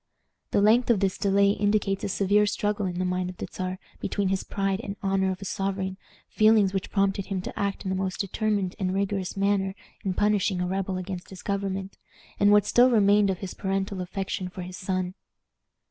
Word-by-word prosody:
The 200 - +2
length 235 +4 +4
of 230 -4 +4
this 195 -1 +1
delay 200 0 +3
indicates 205 -1 +1
a - - -1
severe 205 +2 +3
struggle 205 -1 -1
in 175 -1 -4
the 185 - 0
mind 180 0 -1
of 180 - -9
the - - -4
Czar 185 0 -3 0.2
between 200 -2 -1
his 195 0 0
pride 195 0 -1
and 200 -3 -5
honor 195 -1 +1
as 185 +1 -4
a - - -6
sovereign, 190 0 -2 0.3
feelings 215 -3 +4
which 195 -1 -2
prompted 195 -1 0
him 195 -2 -2
to - - -6
act 200 -1 -2
in - - -1
the - - 0
most 190 0 -2
determined 200 -1 -1
and 185 -1 -1
rigorous 195 -1 -1
manner 195 -1 +1 0.3
in 190 -2 -1
punishing 205 -2 +2
a 180 - 0
rebel 190 0 -2
against 185 -1 -6
his 190 -2 -10
government, 195 -1 -3 0.4
and 205 0 +5
what 210 0 +5
still 245 +1 +5
remained 205 -3 +4
of 190 - 0
his 195 - -5
parental 195 0 -2
affection 185 0 -3
for 185 0 -7
his 180 +1 -8
son. 185 -1 -2
195 Hz, 205 wpm, -26 LUFS, 185-200 Hz, 0.4 s, and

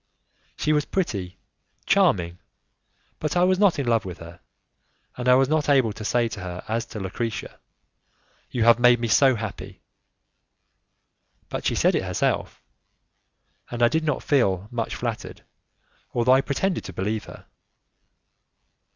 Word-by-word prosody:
She 155 - +1
was 150 -1 +1
pretty, 100 - -3 0.5
charming, 90 - +2 0.8
but 155 +2 -2
I 175 - +4
was 185 0 +3
not 200 -4 +4
in 140 - -2
love 115 -2 +2
with 90 -3 -7
her, 85 +1 -12 0.8
and 125 0 -1
I 125 - +7
was 135 0 +3
not 150 0 0
able 130 -6 +3
to 110 - -9
say 120 +2 +1
to 105 - -7
her 90 -1 -6
as 115 +1 -2
to 105 - -7
Lucrezia: 105 +3 -5 0.9
"You 120 - -1
have 120 +1 +6
made 120 0 +5
me 120 - -1
so 130 +3 +4
happy!" 110 0 -7 1.7
But - - -3
she - - 0
said - - +3
it - - +1
herself, - - -2 1.1
and 120 0 -2
I 120 - +6
did 160 +4 0
not 150 -3 -1
feel 100 -9 +1
much 115 -2 -3
flattered, - - -5 0.7
although 120 +1 +4
I 135 - +5
pretended 175 +7 -1
to - - -8
believe 105 +3 -3
her. - - -12
120 Hz, 150 wpm, -24 LUFS, 105-145 Hz, 1.7 s, I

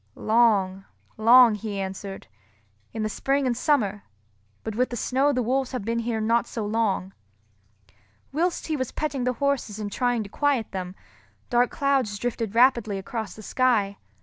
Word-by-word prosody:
"Long, 205 -4 +2 0.3
long," 235 +1 +7
he 210 -1 -4
answered, 195 0 -6 0.7
"in 220 -1 -3
the - - 0
spring 275 +6 0
and 250 -2 +1
summer; 220 -7 +1 0.6
but 220 - -4
with 250 +2 +1
the 240 - -5
snow 265 +5 +1
the 250 -3 0
wolves 260 +3 -1
have 250 -6 -4
been 230 +1 -1
here 230 -1 -2
not 230 +2 +1
so 220 -3 -4
long." 205 -3 -1 1.2
Whilst 335 +5 -1
he 315 - -1
was 260 -4 -3
petting 275 -5 -2
the 250 - +1
horses 270 -5 -1
and 210 -1 -5
trying 245 0 0
to - - -9
quiet 275 -1 0
them, 185 -1 -5 0.6
dark 245 0 +3
clouds 270 -8 0
drifted 225 -1 -3
rapidly 235 -4 +4
across 210 +1 -5
the 215 - -11
sky. 215 -5 +1
230 Hz, 165 wpm, -25 LUFS, 210-255 Hz, 1.2 s, long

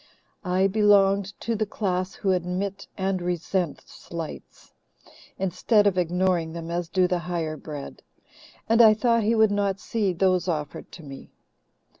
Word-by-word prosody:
I 185 0 +1
belonged 200 -1 +3
to 230 - -1
the 215 0 -1
class 185 -2 -2
who 195 - 0
admit 185 +2 -2
and 190 -1 -1
resent 175 -1 -2
slights, 165 -2 -9 0.6
instead 200 +3 +2
of 200 -2 +3
ignoring 180 -2 0
them, 170 0 -6
as 170 -1 -3
do 185 -1 +2
the 180 0 0
higher 170 -3 -3
bred, 150 -2 -8 0.7
and 225 +1 +5
I 215 -2 +7
thought 230 +1 +2
he 220 +2 +2
would 220 -2 +4
not 200 -1 0
see 210 -4 -1
those 185 0 +1
offered 150 -4 -4
to 170 - -11
me. 135 -2 -10
185 Hz, 150 wpm, -25 LUFS, 175-205 Hz, 0.7 s, I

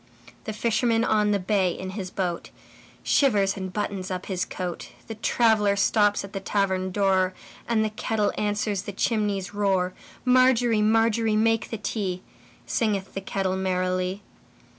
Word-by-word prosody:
The 220 - -3
fisherman 230 +1 +1
on 210 -2 +2
the 205 - +3
bay 190 -1 +1
in 185 +2 -6
his 190 -2 -5
boatShivers 195 +4 -1
and 190 -1 -5
buttons 200 -2 -3
up 185 -1 -4
his 185 -2 -2
coat; 180 -2 -5 0.2
The 225 - -6
traveller 220 -2 +2
stops 205 0 +2
at 200 - -10
the 195 - -3
tavern 190 -1 0
door, 190 -1 +1 0.3
And 220 -2 +2
the 215 - -2
kettle 215 0 -1
answers 205 -1 -1
the 205 - -7
chimney's 205 -2 -1
roar. 190 -3 +1 0.3
Margery, 250 -3 +4
Margery, 225 0 +2
make 225 +1 +2
the 225 - -4
tea, 195 -3 -3 0.4
Singeth 205 -5 -1
the 195 - -4
kettle 190 -1 -1
merrily. 185 +1 -1
205 Hz, 145 wpm, -25 LUFS, 190-220 Hz, 0.4 s, Margery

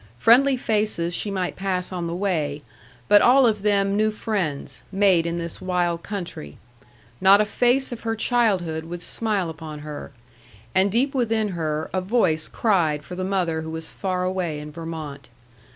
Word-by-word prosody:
Friendly 260 - +5
faces 210 -7 0
she 205 - -1
might 185 -2 -2
pass 185 -2 -2
on 175 -2 -3
the 170 - -3
way; 155 -7 -1 0.4
but 205 -1 +7
all 260 +2 +6
of 215 -3 +1
them 200 -1 +2
new 215 +1 +3
friends, 205 -9 -3
made 190 -4 +3
in 170 0 -2
this 170 -1 -6
wild 175 -2 0
country: 175 - -6 0.7
not 195 +2 +7
a 215 - +3
face 245 +5 +2
of 240 - -6
her 225 -1 -2
childhood 195 -10 +1
would 175 +1 -6
smile 210 -5 -1
upon 155 -2 -8
her; 150 -1 -7 0.6
and 190 +1 +3
deep 260 +6 +1
within 225 -4 +1
her, 155 -4 -2
a 185 - 0
voice 185 -6 +1
cried 165 -9 +1
for - - -9
the 185 +1 -3
mother 180 -4 0
who 160 - -6
was 160 0 -6
far 185 -2 -2
away 180 -4 -2
in 150 0 -8
Vermont. 155 -4 -7
185 Hz, 170 wpm, -23 LUFS, 165-210 Hz, 0.7 s, but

